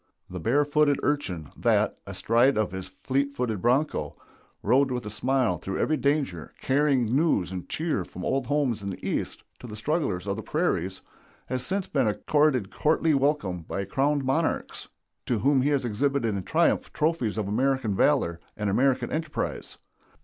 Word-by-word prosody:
The 90 Hz, -, -5 dB
barefooted 145 Hz, -, +2 dB
urchin, 95 Hz, -, -1 dB
that, -, -, +1 dB
astride 120 Hz, +4 st, +2 dB
of 110 Hz, -4 st, 0 dB
his 95 Hz, 0 st, -5 dB
fleet 135 Hz, +9 st, -2 dB
footed 115 Hz, -7 st, -2 dB
bronco, 130 Hz, +6 st, +1 dB, 0.5 s
rode 130 Hz, +6 st, +3 dB
with 125 Hz, -2 st, -3 dB
a 105 Hz, -, -5 dB
smile 120 Hz, -4 st, +1 dB
through 95 Hz, +2 st, -4 dB
every 155 Hz, -, +1 dB
danger, 140 Hz, -, -1 dB
carrying 130 Hz, -4 st, +2 dB
news 140 Hz, -, +2 dB
and 90 Hz, -2 st, -6 dB
cheer 155 Hz, -, -1 dB
from 90 Hz, +1 st, -8 dB
old 135 Hz, -, 0 dB
homes 140 Hz, -7 st, 0 dB
in 100 Hz, -, -4 dB
the 95 Hz, -, -6 dB
East -, -, -3 dB, 0.2 s
to 125 Hz, -, -9 dB
the 105 Hz, -, -7 dB
strugglers 110 Hz, -, -1 dB
of 100 Hz, 0 st, -2 dB
the -, -, -4 dB
prairies, 95 Hz, -, -1 dB, 0.4 s
has 130 Hz, -1 st, -3 dB
since 195 Hz, +4 st, -1 dB
been 135 Hz, -5 st, +1 dB
accorded 130 Hz, 0 st, +1 dB
courtly 160 Hz, +1 st, +2 dB
welcome 135 Hz, -, +1 dB
by 95 Hz, +4 st, -4 dB
crowned 140 Hz, +7 st, 0 dB
monarchs, 160 Hz, +5 st, -1 dB, 0.4 s
to 120 Hz, -, +1 dB
whom 135 Hz, +5 st, +3 dB
he 140 Hz, -, +2 dB
has 140 Hz, -3 st, +1 dB
exhibited 120 Hz, 0 st, 0 dB
in 100 Hz, -, -2 dB
triumph -, -, +1 dB
trophies 150 Hz, -9 st, 0 dB
of 105 Hz, -3 st, -1 dB
American 130 Hz, 0 st, +1 dB
valor 95 Hz, -, +2 dB, 0.2 s
and 105 Hz, -1 st, -1 dB
American 130 Hz, +2 st, +2 dB
enterprise. 155 Hz, -1 st, -3 dB
130 Hz, 165 wpm, -26 LUFS, 100-145 Hz, 0.5 s, rode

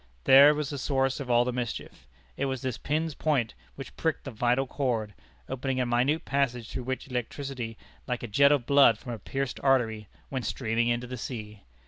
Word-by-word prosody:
There 140 Hz, +3 st, +8 dB
was 150 Hz, -1 st, -3 dB
the 140 Hz, -, -4 dB
source 135 Hz, 0 st, 0 dB
of 135 Hz, -3 st, -6 dB
all 120 Hz, 0 st, +4 dB
the 125 Hz, -, -2 dB
mischief. 120 Hz, -, -5 dB, 0.3 s
It 140 Hz, -, -1 dB
was 130 Hz, -2 st, -3 dB
this 130 Hz, -2 st, -3 dB
pin's 155 Hz, +2 st, -1 dB
point 135 Hz, -7 st, 0 dB, 0.2 s
which 135 Hz, -, -9 dB
pricked 160 Hz, -2 st, -1 dB
the 135 Hz, -, -6 dB
vital 125 Hz, +3 st, +1 dB
cord, 120 Hz, -6 st, -2 dB, 0.3 s
opening 130 Hz, 0 st, -2 dB
a 125 Hz, -, +1 dB
minute 125 Hz, +6 st, +1 dB
passage 125 Hz, -5 st, -1 dB
through 125 Hz, -, -5 dB
which 130 Hz, 0 st, -3 dB
the 135 Hz, -, -15 dB
electricity, 125 Hz, -1 st, -4 dB, 0.3 s
like 125 Hz, -2 st, -3 dB
a -, -, -3 dB
jet 140 Hz, +7 st, +5 dB
of 140 Hz, -5 st, +2 dB
blood 140 Hz, -3 st, +6 dB
from 120 Hz, -, -7 dB
a 115 Hz, -, -6 dB
pierced 135 Hz, +5 st, -3 dB
artery, 115 Hz, -6 st, +1 dB, 0.2 s
went 130 Hz, -5 st, -2 dB
streaming 115 Hz, -1 st, 0 dB
into 120 Hz, +1 st, 0 dB
the 125 Hz, +1 st, -6 dB
sea. 105 Hz, -4 st, -7 dB
130 Hz, 200 wpm, -28 LUFS, 120-140 Hz, 0.3 s, There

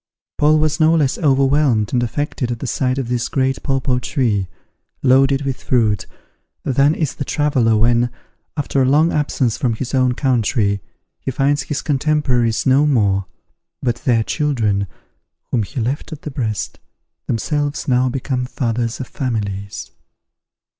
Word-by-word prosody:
Paul 155 Hz, +1 st, +5 dB
was 155 Hz, 0 st, +1 dB
no 160 Hz, +1 st, +5 dB
less 145 Hz, -5 st, +1 dB
over 140 Hz, -3 st, +3 dB
whelmed 135 Hz, -7 st, +2 dB
and 125 Hz, -, +2 dB
affected 125 Hz, 0 st, -2 dB
at 120 Hz, -, -2 dB
the 125 Hz, -, -6 dB
sight 130 Hz, 0 st, 0 dB
of 135 Hz, -3 st, -2 dB
this 120 Hz, -1 st, -1 dB
great 135 Hz, -1 st, 0 dB
papaw 135 Hz, -2 st, 0 dB
tree, 110 Hz, -7 st, 0 dB, 0.6 s
loaded 135 Hz, +2 st, +4 dB
with 135 Hz, -2 st, -3 dB
fruit, 110 Hz, -5 st, +1 dB, 0.6 s
than 140 Hz, +4 st, +3 dB
is 155 Hz, -5 st, -1 dB
the -, -, -4 dB
traveller 130 Hz, -7 st, +2 dB
when, 120 Hz, +2 st, +3 dB, 0.5 s
after 140 Hz, -1 st, 0 dB
a -, -, +4 dB
long 155 Hz, +4 st, +4 dB
absence 135 Hz, -5 st, 0 dB
from 120 Hz, -4 st, +1 dB
his 125 Hz, +4 st, -5 dB
own 130 Hz, -2 st, +2 dB
country, 115 Hz, -6 st, +1 dB, 0.4 s
he -, -, -4 dB
finds 140 Hz, +2 st, +1 dB
his 150 Hz, +3 st, -4 dB
contemporaries 135 Hz, -6 st, +1 dB
no 140 Hz, +3 st, +4 dB
more, 100 Hz, -8 st, +2 dB, 0.6 s
but 120 Hz, -2 st, 0 dB
their 115 Hz, -3 st, +1 dB
children, 110 Hz, -10 st, 0 dB, 0.6 s
whom 120 Hz, -, +2 dB
he 105 Hz, +5 st, -5 dB
left 125 Hz, +6 st, -2 dB
at 155 Hz, -1 st, -8 dB
the 150 Hz, -, -5 dB
breast, 110 Hz, -6 st, -3 dB, 0.5 s
themselves 145 Hz, +5 st, -1 dB
now 130 Hz, -1 st, +3 dB
become 125 Hz, 0 st, -2 dB
fathers 115 Hz, -2 st, -2 dB
of 130 Hz, -, -5 dB
families. 100 Hz, -6 st, -4 dB
130 Hz, 155 wpm, -19 LUFS, 115-145 Hz, 0.6 s, Paul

